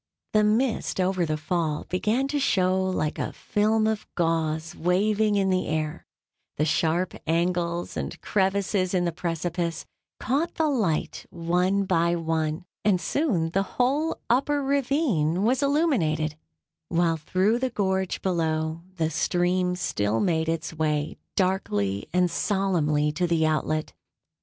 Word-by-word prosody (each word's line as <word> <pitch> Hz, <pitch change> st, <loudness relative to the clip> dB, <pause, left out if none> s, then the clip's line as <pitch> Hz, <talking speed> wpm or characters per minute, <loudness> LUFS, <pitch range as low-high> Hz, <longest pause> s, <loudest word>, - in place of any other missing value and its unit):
The 215 Hz, -1 st, +4 dB
mist 220 Hz, 0 st, +1 dB
over 185 Hz, -2 st, +1 dB
the 155 Hz, 0 st, -1 dB
Fall 155 Hz, -1 st, -1 dB
began 215 Hz, +9 st, 0 dB
to 290 Hz, 0 st, 0 dB
show 185 Hz, -7 st, +2 dB
like 185 Hz, -5 st, -1 dB
a -, -, -3 dB
film 215 Hz, +1 st, +1 dB
of 220 Hz, -1 st, -1 dB
gauze 165 Hz, -1 st, 0 dB
waving 205 Hz, +4 st, +2 dB
in 195 Hz, -1 st, +2 dB
the 185 Hz, 0 st, 0 dB
air; 155 Hz, -1 st, -3 dB, 0.5 s
the 150 Hz, -, +2 dB
sharp 165 Hz, +3 st, +1 dB
angles 170 Hz, +1 st, 0 dB
and -, -, -4 dB
crevices 190 Hz, -1 st, 0 dB
in 175 Hz, -1 st, +2 dB
the 170 Hz, -, 0 dB
precipice 170 Hz, 0 st, -3 dB, 0.3 s
caught 295 Hz, +7 st, -1 dB
the 320 Hz, -, +1 dB
light 200 Hz, -, -1 dB
one 180 Hz, +4 st, +1 dB
by 170 Hz, -2 st, +2 dB
one, 160 Hz, 0 st, -1 dB, 0.2 s
and 200 Hz, -3 st, +3 dB
soon 175 Hz, -, 0 dB
the 195 Hz, -, +2 dB, 0.2 s
whole 285 Hz, +6 st, +1 dB
upper 280 Hz, +4 st, +2 dB
ravine 265 Hz, -, +1 dB
was 250 Hz, +5 st, +2 dB
illuminated, 225 Hz, -, +1 dB, 0.5 s
while 170 Hz, -1 st, +2 dB
through 190 Hz, +9 st, +1 dB
the 260 Hz, 0 st, 0 dB
gorge 190 Hz, -4 st, -1 dB
below 160 Hz, -3 st, -1 dB
the 160 Hz, -2 st, 0 dB
stream 180 Hz, +3 st, +1 dB
still 105 Hz, -, -1 dB
made 160 Hz, -3 st, +1 dB
its 165 Hz, 0 st, -2 dB
way 155 Hz, -1 st, -1 dB, 0.2 s
darkly 105 Hz, -, 0 dB
and 180 Hz, 0 st, +2 dB
solemnly 160 Hz, -7 st, +1 dB
to 175 Hz, +4 st, 0 dB
the 165 Hz, -2 st, +2 dB
outlet. 155 Hz, 0 st, -1 dB
180 Hz, 140 wpm, -26 LUFS, 160-205 Hz, 0.5 s, The